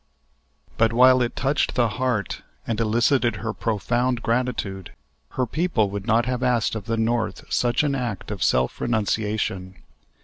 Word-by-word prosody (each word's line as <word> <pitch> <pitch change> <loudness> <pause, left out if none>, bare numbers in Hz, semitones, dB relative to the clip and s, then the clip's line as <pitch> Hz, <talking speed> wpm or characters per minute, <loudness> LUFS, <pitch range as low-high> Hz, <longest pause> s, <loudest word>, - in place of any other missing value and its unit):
But 115 0 +3
while 130 +1 +6
it 120 0 -1
touched 140 +2 0
the 120 -2 +3
heart 125 -3 -2 0.2
and 115 -1 -2
elicited 120 +2 +2
her 115 +2 -4
profound 120 +3 -1
gratitude, 115 -6 -2 0.4
her 130 - 0
people 125 - 0
would 100 -1 -5
not 115 +2 +3
have 125 -1 -2
asked 120 -3 +1
of 110 -2 -5
the 115 0 -1
North 115 0 -1
such 120 +4 +2
an 145 -2 +1
act 120 -8 -4
of 100 -5 -3
self 65 0 +1
renunciation. 105 -4 -1
115 Hz, 150 wpm, -23 LUFS, 105-125 Hz, 0.4 s, while